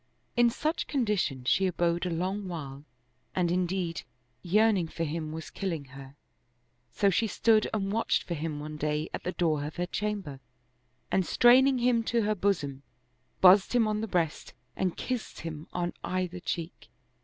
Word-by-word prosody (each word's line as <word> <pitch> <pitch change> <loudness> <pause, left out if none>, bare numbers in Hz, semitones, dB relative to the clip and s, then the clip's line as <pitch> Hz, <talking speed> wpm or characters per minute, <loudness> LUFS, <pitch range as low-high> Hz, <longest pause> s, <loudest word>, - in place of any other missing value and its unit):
In 240 0 +5
such 305 +7 -2
condition 210 - 0
she 190 +9 +3
abode 175 0 0
a - - -1
long 185 +4 -2
while 145 -5 -7 0.5
and 175 -2 +1
indeed 180 -1 -1 0.4
yearning 200 -1 +3
for 165 - -4
him 155 0 -3
was 160 0 -7
killing 170 -7 -3
her; 135 0 -11 0.8
so 200 - +2
she 225 +5 +1
stood 220 0 +3
and 195 -2 -1
watched 225 +2 +1
for 175 - -4
him 155 -1 -3
one 150 +1 -6
day 150 +1 -1
at - - -4
the 180 - -2
door 155 -5 0
of 150 - -6
her 175 - -1
chamber 195 -7 -3 0.7
and 190 - +3
straining 255 +7 +5
him 245 -1 +3
to 235 -1 +1
her 215 +1 +1
bosom, 175 -9 -1 0.6
bussed 190 +5 +6
him 230 -3 +4
on 215 0 -1
the 225 - -2
breast 170 -6 -2 0.2
and 185 -2 -1
kissed 250 -3 -4
him 160 -2 -6
on 175 0 -2
either 185 -1 -2
cheek. 170 -1 -5
180 Hz, 165 wpm, -29 LUFS, 160-210 Hz, 0.8 s, bussed